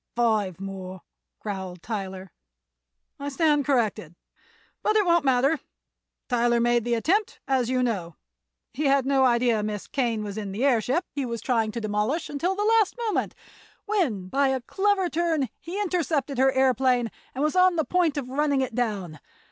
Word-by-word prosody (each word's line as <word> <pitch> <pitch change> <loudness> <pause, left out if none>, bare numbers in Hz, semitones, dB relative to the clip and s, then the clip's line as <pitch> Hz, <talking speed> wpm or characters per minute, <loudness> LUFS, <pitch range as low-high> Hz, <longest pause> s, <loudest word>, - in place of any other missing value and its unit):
"Five 215 -6 +1
more," 190 -1 -7 0.3
growled 190 -4 -6
Tyler. 190 -4 -5 0.9
"I 285 0 -3
stand 295 -1 +2
corrected; 220 - 0 0.7
but 430 - +1
it 425 -2 +4
won't 340 -2 +3
matter. 270 +3 +2 0.7
Tyler 240 -1 +2
made 240 -1 +2
the 240 -1 +1
attempt, 380 - 0
as 260 -3 +1
you 255 0 +1
know. 185 -9 -2 0.6
He 295 +4 -2
had 275 -1 +3
no 270 -1 +3
idea 235 -3 +3
Miss 210 -1 -4
Kane 235 -5 -1
was 205 0 -5
in 200 -2 -5
the 235 +7 0
airship 260 - +2
he 285 - -3
was 235 -2 -3
trying 225 -1 0
to 235 - -4
demolish 215 +9 -1
until 340 +6 -1
the 415 +1 -1
last 445 0 +3
moment, 430 - -1 0.5
when 295 - 0
by 275 +8 +2
a 265 -1 0
clever 385 - +1
turn 325 -5 0
he 360 +4 -6
intercepted 320 -8 -1
her 265 0 +5
aëroplane 255 -3 +2 0.2
and 270 - -1
was 305 +2 0
on 365 -1 +5
the 315 -3 0
point 335 0 +1
of 270 -3 -3
running 280 +1 +1
it 260 -3 -2
down. 200 -10 -2
255 Hz, 170 wpm, -25 LUFS, 220-300 Hz, 0.9 s, her